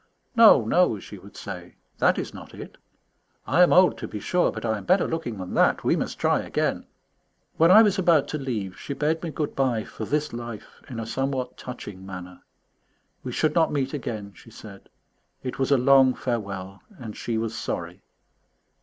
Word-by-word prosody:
"No, 220 - +7
no," 145 -1 +3
she 100 0 -11
would 100 +2 -15
say, 90 -4 -8 0.2
"that - - +3
is - - -4
not - - -11
it. - - -10 0.7
I 175 - +3
am 180 - +6
old, 185 0 +5
to - - -5
be 105 - -6
sure, 180 - +1
but - - -6
I 110 -2 0
am - - -10
better 185 +1 +3
looking 160 -9 -4
than 95 -1 -6
that. - - +3
We - - +3
must - - -3
try - - +2
again." - - -2 0.7
When 165 +1 +5
I 215 +5 +9
was 205 -2 +2
about 170 -6 +3
to 155 - -3
leave 105 -9 -4
she 140 - -5
bade 155 +3 0
me 170 - -4
good 155 -1 -3
bye 125 -5 +1
for 110 - -7
this 150 +3 -1
life 120 -3 -8
in 120 -3 -6
a 115 - -4
somewhat 135 +2 -2
touching 105 -6 -9
manner. 90 -1 -9 0.8
We 125 - -5
should 155 +5 +1
not 165 -2 +3
meet 135 -1 -1
again, 110 -7 -5
she 115 - -16
said; 100 -3 -13 0.5
it 125 - -5
was 135 - +1
a 140 - +5
long 130 0 +5
farewell, 100 -5 -4 0.2
and 110 -6 -8
she 115 -2 -3
was 115 0 -3
sorry. - - -5
125 Hz, 195 wpm, -25 LUFS, 105-150 Hz, 0.8 s, I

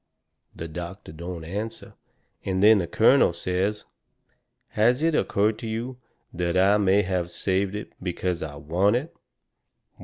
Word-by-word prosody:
The 80 - -6
doctor 85 +3 -8
don't 85 +1 -7
answer, 105 +7 -6 0.5
and 95 0 -1
then 110 0 +7
the 85 - -2
colonel 115 -2 +4
says: 90 +5 -2 0.8
"Has 120 +7 +2
it 165 0 +2
occurred 105 -6 +1
to 115 - -6
you 120 +3 -4 0.3
that 85 +1 -1
I 100 +3 +5
may 100 0 +3
have 90 -2 -2
saved 95 +2 -1
it 105 - -7
because 90 -1 -2
I 75 -2 -5
want 85 +9 +1
it?" 145 +7 -3
95 Hz, 145 wpm, -25 LUFS, 85-110 Hz, 0.8 s, then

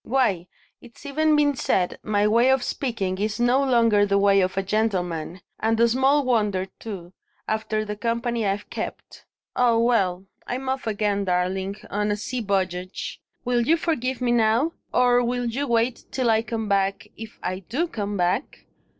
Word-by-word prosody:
Why, 215 -9 +1 0.3
it's 240 +3 -16
even 305 +2 +2
been 290 -1 +3
said 180 -7 0
my 205 -1 +1
way 235 +4 +4
of 265 -1 +3
speaking 195 -10 -2
is 215 +2 -2
no 245 +3 +3
longer 230 -5 +4
the 200 -1 +2
way 200 0 +4
of 185 +1 -1
a 195 - +1
gentleman; 185 -5 -1 0.2
and 225 +1 +1
small 265 +4 +3
wonder, 210 -6 +1
too, 185 -5 -8 0.3
after 215 0 -1
the 210 0 -4
company 235 +1 -1
I've 200 0 -1
kept. - - -7 0.3
Ah, 240 -2 +3
well! 195 -6 +1 0.2
I'm 260 +2 -3
off 265 -2 -2
again, 205 -2 0
darling, 190 +2 -1 0.2
on 210 +1 0
a 205 - 0
sea 250 +4 -4
voyage. 185 -3 -3 0.2
Will 245 -1 +2
you 315 +8 +3
forgive 260 -7 -2
me 245 -1 +1
now? 235 +6 +3 0.2
or 245 0 +4
will 245 +1 -1
you 265 +5 -2
wait 235 +1 0
till 250 -3 +1
I 220 0 +3
come 225 -1 -4
back, 195 -1 0
if 225 0 -10
I 185 +1 -2
do 255 - -2
come 205 -8 -4
back? 180 +9 -1
220 Hz, 170 wpm, -24 LUFS, 200-245 Hz, 0.3 s, way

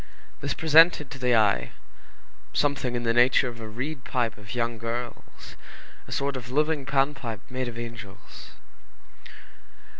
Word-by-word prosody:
This - - -3
presented 160 -2 +5
to 135 - -8
the 125 -1 +3
eye, 105 -3 +2 0.8
something 140 -4 0
in 120 - -2
the 115 -1 +1
nature 125 +2 +4
of 120 -1 -7
a 110 - -7
reed 130 +5 -5
pipe 120 -4 -1
of 105 +4 -9
young 115 -1 -1
girls, 120 +1 -6 0.5
a - - -11
sort 140 0 -1
of 125 -1 -7
living 150 +1 0
Pan 140 +1 +2
pipe 115 -7 -6
made 130 0 -2
of 120 -1 -7
angels. 115 -4 -9
125 Hz, 150 wpm, -26 LUFS, 115-140 Hz, 0.8 s, presented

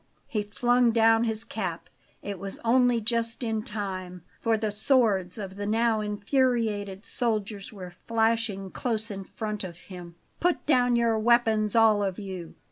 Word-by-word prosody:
He 215 - -2
flung 240 +4 +2
down 225 0 +4
his 220 -1 0
cap. 185 -7 -4 0.4
It 200 -2 -5
was 195 +1 -6
only 245 0 +4
just 230 +2 -1
in 220 -2 -1
time, 190 -6 -5 0.2
for 225 -1 +1
the 215 -1 -1
swords 210 -5 +2
of 195 -2 -7
the 205 0 -3
now 225 +1 +2
infuriated 210 -2 0
soldiers 215 -4 -2
were 185 -4 -9
flashing 225 -4 0
close 225 -2 -2
in 195 -1 -5
front 210 +1 -5
of 175 -3 -7
him. 180 -2 -11 0.2
"Put 355 0 +1
down 250 -4 +3
your 230 -2 +2
weapons, 220 -2 +3
all 220 -2 +5
of 190 -2 -2
you!" 185 -5 -7
215 Hz, 155 wpm, -27 LUFS, 195-230 Hz, 0.4 s, all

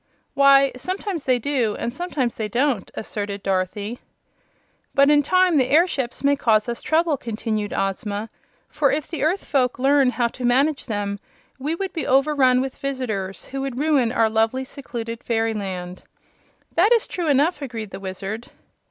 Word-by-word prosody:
"Why, 275 -1 +6
sometimes 370 - -4
they 255 -1 +3
do, 245 -4 0
and 235 +1 -3
sometimes 280 -7 -2
they 220 - -3
don't," 245 -1 0
asserted 205 -2 -5
Dorothy. 195 +4 -2 1.0
"But 280 +1 +5
in 295 -1 +5
time 365 +2 +3
the 255 -2 +2
airships 285 -6 +1
may 285 0 +4
cause 220 -5 +2
us 235 -1 -4
trouble," 320 -2 +1
continued 215 -3 -3
Ozma, 205 +2 -2 0.4
"for 295 -2 +1
if 295 +1 -1
the 325 - -5
earth 335 +7 0
folk 255 -3 +1
learn 270 +1 +4
how 240 0 +1
to 250 - -9
manage 270 +5 +2
them 205 -2 -2 0.4
we 300 +5 -2
would 380 +1 -4
be 320 - -3
overrun 265 -2 +4
with 265 0 -4
visitors 225 -9 -4
who 270 +1 -5
would 270 -2 -4
ruin 280 -5 +2
our 225 -2 +3
lovely, 225 +4 +1
secluded 235 -4 -7
fairyland." 200 -6 -2 0.7
"That 390 +7 +4
is 465 - +3
true 350 -3 -4
enough," 295 +3 +2
agreed 225 -6 -6
the - - -7
Wizard. 195 +4 -6
255 Hz, 160 wpm, -22 LUFS, 220-285 Hz, 1.0 s, Why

